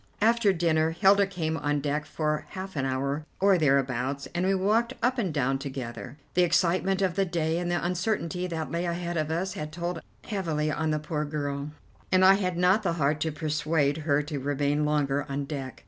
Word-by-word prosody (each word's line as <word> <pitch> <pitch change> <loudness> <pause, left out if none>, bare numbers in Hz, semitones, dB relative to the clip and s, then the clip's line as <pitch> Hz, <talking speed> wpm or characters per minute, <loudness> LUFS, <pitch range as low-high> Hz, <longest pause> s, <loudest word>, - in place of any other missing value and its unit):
After 225 -1 +4
dinner 165 -3 +2
Hilda 200 +1 +5
came 165 -5 -2
on 145 -1 0
deck 150 +1 -2
for 150 0 -2
half 190 -1 -7
an 135 -2 -1
hour 140 +3 -1 0.2
or 195 -1 +4
thereabouts, 135 -2 +1
and 175 +2 0
we 195 - +3
walked 220 +6 +1
up 250 +1 +2
and 190 -7 0
down 135 -2 0
together. 130 -2 -6 0.2
The 180 - +3
excitement 185 +2 +2
of 185 -2 +1
the 195 +2 +1
day 165 -2 -1
and 175 0 -2
the 175 0 0
uncertainty 180 -1 -1
that 160 -3 -4
lay 170 +1 -1
ahead 175 0 -3
of 155 -2 -1
us 180 +4 -1
had 155 -6 -5
told 170 0 -4 0.2
heavily 160 -7 -1
on 155 +1 -1
the 155 - +1
poor 150 0 -3
girl, 145 -1 -3 0.4
and 185 0 +5
I 190 - +9
had 185 -3 -1
not 180 +4 +4
the 190 -5 0
heart 150 -2 +1
to 160 - -1
persuade 150 -1 0
her 150 -2 +1
to 145 -1 -4
remain 145 +2 0
longer 145 -2 +1
on 140 +1 -2
deck. 135 -3 -6
160 Hz, 200 wpm, -27 LUFS, 145-180 Hz, 0.4 s, I